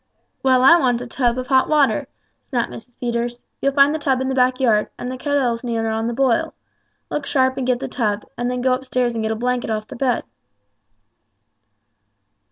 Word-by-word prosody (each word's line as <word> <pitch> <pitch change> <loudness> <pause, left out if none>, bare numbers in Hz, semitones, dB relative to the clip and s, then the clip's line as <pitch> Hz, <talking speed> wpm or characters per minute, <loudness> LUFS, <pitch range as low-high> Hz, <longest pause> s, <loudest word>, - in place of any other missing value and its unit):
"Well, 260 -1 +3
I 335 +6 +8
want 245 -4 +1
a - - -5
tub 240 0 0
of 255 - -3
hot 260 0 +3
water," 295 -3 +2 0.3
snapped 240 -3 -2
Mrs. 245 +1 -12
Peters. 240 0 -2 0.2
"You'll 275 - +1
find 280 +1 +5
the 315 - -2
tub 270 -3 +1
in 260 0 -1
the - - -1
backyard, 250 -4 +2
and 250 - -5
the - - -4
kettle's 255 -3 0
near 225 -2 -1
on 225 +1 -1
the - - -1
boil. 255 -2 +1 0.6
Look 290 -1 -3
sharp 260 -1 +2
and 260 -2 -2
get 250 -1 +1
the - - -4
tub, 210 -4 -2
and 240 0 -2
then 250 0 -2
go 255 0 +2
upstairs 255 -2 -1
and 225 - -3
get 220 - -1
a 220 - -1
blanket 245 +1 -1
off 215 -1 -2
the - - -10
bed." 245 -2 0
250 Hz, 200 wpm, -21 LUFS, 235-265 Hz, 0.6 s, I